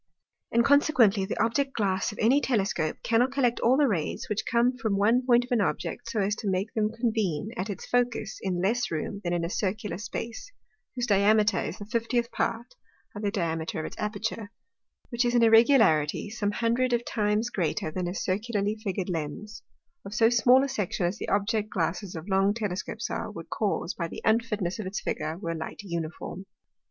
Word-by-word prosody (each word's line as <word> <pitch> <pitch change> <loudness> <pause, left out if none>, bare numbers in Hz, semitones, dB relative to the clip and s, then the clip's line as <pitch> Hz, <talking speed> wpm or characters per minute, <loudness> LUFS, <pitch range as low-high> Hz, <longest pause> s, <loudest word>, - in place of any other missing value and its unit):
And 235 0 +3
consequently 245 -9 +4
the 190 - -4
Object 250 +5 +1
glass 195 -3 0
of 210 - -11
any 255 +6 +4
Telescope 195 - 0
cannot 240 +3 +2
collect 255 -3 +1
all 250 +3 +4
the 290 -1 +4
Rays, 175 -10 -2
which 210 0 -2
come 240 +2 +2
from 220 -5 -1
one 225 +5 +3
point 245 -1 +4
of 250 - -21
an 240 -3 +3
Object, 230 +4 -2
so 230 - -1
as 200 +2 +1
to 210 - -3
make 190 +4 -1
them 215 -1 +1
convene 220 -6 -1
at 205 -2 -3
its 200 - -5
Focus 240 -3 -1
in 180 -2 -1
less 240 +5 +1
room 170 +5 -4
than 175 - -1
in 175 -1 0
a - - -1
Circular 205 -1 -2
space, 230 - -6 0.4
whose 245 -1 -1
Diameter 210 0 +3
is - - -4
the 205 - -8
fiftieth 235 +2 -1
part 230 - -2 0.4
of 205 - -5
the 205 - 0
Diameter 165 -6 -2
of - - -5
its - - -7
Aperture; 210 0 -3 0.6
which 240 0 0
is 240 0 +1
an 240 - +5
irregularity, 225 - +4
some 215 -3 -1
hundred 235 +4 +1
of 240 0 0
times 215 +2 0
greater, 160 -3 -1
than 180 +1 -3
a 175 - -4
circularly 205 +2 -1
figur'd 190 -3 -2
Lens, 175 +5 -5 0.4
of 200 +1 -7
so 230 -1 +4
small 250 +2 +5
a - - 0
section 205 -8 -2
as 175 +3 -2
the - - -4
Object 210 +2 0
glasses 180 +1 -2
of 160 +3 -7
long 195 +1 +2
Telescopes 210 0 -4
are, - - -3
would 165 -6 -9
cause 205 -3 -1
by 170 - -3
the - - -9
unfitness 220 -4 +1
of 205 - -4
its 195 - -3
Figure, 160 +1 -3
were 170 -3 -3
Light 160 -1 -6
uniform. 170 +1 -5
210 Hz, 195 wpm, -27 LUFS, 190-235 Hz, 0.6 s, an